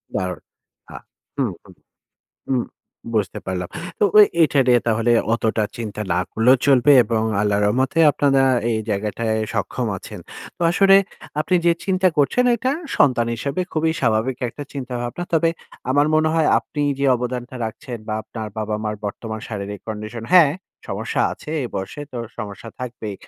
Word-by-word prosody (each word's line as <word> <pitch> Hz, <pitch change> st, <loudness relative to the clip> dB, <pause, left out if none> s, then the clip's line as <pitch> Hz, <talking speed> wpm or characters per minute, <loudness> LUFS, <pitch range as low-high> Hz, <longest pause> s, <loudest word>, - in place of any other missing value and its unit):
দারুণ। 90 Hz, -1 st, -2 dB, 0.5 s
আ -, -, -9 dB, 0.4 s
হু, -, -, +2 dB, 0.2 s
হু, -, -, -19 dB, 0.8 s
হু। -, -, 0 dB, 0.6 s
বুঝতে 105 Hz, -3 st, 0 dB
পারলাম। 90 Hz, -1 st, -3 dB, 0.3 s
তো -, -, +5 dB, 0.2 s
এ -, -, +9 dB, 0.2 s
এটা 145 Hz, -3 st, +2 dB
নিয়ে 120 Hz, -1 st, +5 dB
তাহলে 115 Hz, +1 st, +1 dB, 0.2 s
অতটা 110 Hz, -1 st, 0 dB
চিন্তা 110 Hz, -3 st, -5 dB
না 90 Hz, -, +1 dB
করলেও 125 Hz, +4 st, +4 dB
চলবে 135 Hz, 0 st, +5 dB
এবং 110 Hz, 0 st, 0 dB, 0.2 s
আল্লাহর 105 Hz, 0 st, +1 dB
রহমতে 130 Hz, +8 st, +1 dB
আপনারা 140 Hz, -1 st, +2 dB, 0.3 s
এই 110 Hz, -, 0 dB
জায়গাটায় 105 Hz, +2 st, -1 dB, 0.2 s
সক্ষম -, -, -2 dB
আছেন। -, -, -9 dB, 0.4 s
তো -, -, -49 dB
আসলে 195 Hz, +2 st, +6 dB, 0.4 s
আপনি 155 Hz, +4 st, 0 dB
যে 170 Hz, -, +6 dB
চিন্তা 185 Hz, -1 st, +2 dB
করছেন 150 Hz, -, +3 dB
এটা 255 Hz, +4 st, 0 dB, 0.3 s
সন্তান 125 Hz, -4 st, +4 dB
হিসেবে 140 Hz, +8 st, -3 dB
খুবই 160 Hz, 0 st, +1 dB
স্বাভাবিক 115 Hz, +1 st, +1 dB
একটা 145 Hz, -, -8 dB
চিন্তাভাবনা। 125 Hz, +3 st, -4 dB
তবে 165 Hz, 0 st, +3 dB, 0.4 s
আমার 145 Hz, +2 st, +3 dB
মনে 155 Hz, 0 st, +3 dB
হয় 160 Hz, -2 st, +3 dB
আপনি 145 Hz, -, -5 dB, 0.2 s
যে 140 Hz, -, 0 dB
অবদানটা 125 Hz, +1 st, -5 dB
রাখছেন 115 Hz, +2 st, -6 dB
বা 110 Hz, -, -1 dB
আপনার 110 Hz, +1 st, -7 dB
বাবা-মার 105 Hz, 0 st, -2 dB
বর্তমান 110 Hz, +2 st, -5 dB
শারীরিক 105 Hz, -2 st, -5 dB
কন্ডিশন। 110 Hz, +1 st, -6 dB
হ্যাঁ, 165 Hz, -6 st, +7 dB, 0.4 s
সমস্যা -, -, -2 dB
আছে -, -, -12 dB
এই 120 Hz, -, -3 dB
বয়সে 95 Hz, +9 st, -5 dB
তো 125 Hz, -, -5 dB, 0.2 s
সমস্যা 105 Hz, 0 st, -7 dB
থাকবেই। 115 Hz, -4 st, -5 dB
120 Hz, 155 wpm, -21 LUFS, 110-145 Hz, 0.8 s, এ